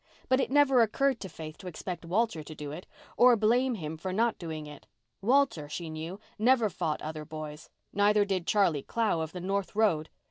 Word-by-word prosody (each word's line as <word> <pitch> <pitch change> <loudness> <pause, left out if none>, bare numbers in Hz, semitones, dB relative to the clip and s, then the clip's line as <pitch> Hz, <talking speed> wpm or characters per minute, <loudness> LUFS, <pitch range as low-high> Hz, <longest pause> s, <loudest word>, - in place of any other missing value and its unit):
But 260 +1 +4
it - - 0
never 270 -2 +5
occurred 260 +3 +2
to 190 - -6
Faith 155 -2 -9
to 185 - -9
expect 180 0 -6
Walter 200 0 0
to 155 +1 -10
do 145 -1 -6
it, 165 +5 -8 0.3
or 245 0 +7
blame 240 +4 +2
him 160 -5 -5
for 185 +4 -4
not 225 +4 +1
doing 160 -3 -5
it. 150 -1 -12 0.3
Walter, 235 - +2
she 160 +1 -5
knew, 160 +5 -6 0.2
never 235 -2 +4
fought 160 -4 -2
other 155 0 -5
boys. 155 0 -8 0.2
Neither 205 0 +4
did 185 -3 -2
Charlie 185 -9 +3
Clow 215 -2 0
of 160 0 -4
the 180 - -6
north 195 +2 -2
road. 175 -8 +2
185 Hz, 200 wpm, -29 LUFS, 155-225 Hz, 0.3 s, or